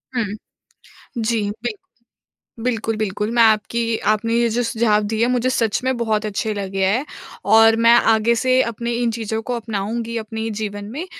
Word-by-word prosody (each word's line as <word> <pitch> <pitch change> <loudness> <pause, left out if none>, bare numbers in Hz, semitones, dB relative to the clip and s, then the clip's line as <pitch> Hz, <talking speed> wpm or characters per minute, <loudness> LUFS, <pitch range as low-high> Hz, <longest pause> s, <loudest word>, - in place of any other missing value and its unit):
हुँ। 240 - +1 0.9
जी, 225 -1 0
बिल्कुल। 220 0 -6 0.8
बिल्कुल, 225 -3 -1
बिल्कुल। 210 0 -2
मैं 235 - +5
आपकी 225 +1 +2 0.2
आपने 230 +2 -1
ये 235 0 +3
जो 245 - +2
सुझाव 225 -2 +1
दिए 220 +2 +2
मुझे 250 +1 +1
सच 230 -2 0
में 260 -1 0
बहुत 220 -2 -1
अच्छे 215 +1 -2
लगे 195 -1 -2
हैं 230 +8 +1 0.5
और 225 0 +7
मैं 235 - +8 0.2
आगे 220 +2 +2
से 255 0 +3
अपने 235 +1 -3
इन 235 - +1
चीज़ों 220 -1 -3
को - - 0
अपनाऊँगी 225 +1 -4
अपने 225 +1 -4
जीवन 205 -1 -4
में 345 +4 -4
225 Hz, 165 wpm, -20 LUFS, 215-235 Hz, 0.9 s, मैं